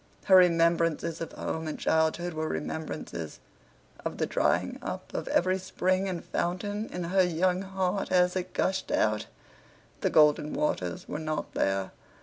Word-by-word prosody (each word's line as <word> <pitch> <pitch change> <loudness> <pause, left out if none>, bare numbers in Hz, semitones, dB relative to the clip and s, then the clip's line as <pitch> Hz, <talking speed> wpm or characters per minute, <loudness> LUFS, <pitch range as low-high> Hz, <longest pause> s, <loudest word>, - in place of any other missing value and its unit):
Her 190 - +6
remembrances 170 -2 +3
of 165 - -4
home 160 0 -4
and 155 - -4
childhood 160 +2 +1
were 155 0 -2
remembrances 150 - -5 0.6
of - - -4
the - - +1
drying - - 0
up - - -6
of - - -3
every 185 +2 +2
spring 185 +1 0
and 175 -2 -4
fountain 205 +5 -2
in 180 - -4
her 185 +3 +2
young 180 +1 +2
heart 190 0 -2
as 180 0 +3
it 185 -1 -3
gushed 190 0 0
out. 105 -1 +1 0.7
The - - +1
golden 150 -1 +4
waters 90 - -2
were 150 - -4
not 155 -1 -3
there. 95 0 0
170 Hz, 150 wpm, -28 LUFS, 155-185 Hz, 0.7 s, Her